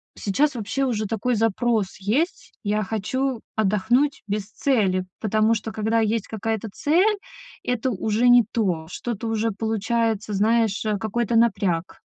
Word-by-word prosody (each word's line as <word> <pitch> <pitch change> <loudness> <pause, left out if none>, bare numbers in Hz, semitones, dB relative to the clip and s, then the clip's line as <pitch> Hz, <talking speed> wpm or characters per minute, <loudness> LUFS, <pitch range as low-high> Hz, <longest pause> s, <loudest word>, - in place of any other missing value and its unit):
сейчас 285 +9 +1
вообще 240 +5 -2
уже 225 -5 0
такой 225 +4 -1
запрос 225 -1 +1
есть. 245 - -1
Я 210 0 0
хочу 240 +5 -2 0.2
отдохнуть 220 +7 +2
без 205 0 -1
цели, 195 -10 +1 0.2
потому 215 +1 +2
что 220 0 -4
когда 220 +1 0
есть 220 -1 0
какая-то 220 0 -3
цель, 370 - +2 0.5
это 245 +1 -1
уже 220 +3 +1
не 245 -1 +7
то. 180 -8 -1
Что-то 230 +3 -4
уже 225 0 0
получается, 220 0 -1
знаешь, 220 +1 +2
э, 210 -1 +1
какой-то 220 +3 -1
напряг. 195 -7 +1
220 Hz, 140 wpm, -23 LUFS, 205-240 Hz, 0.5 s, не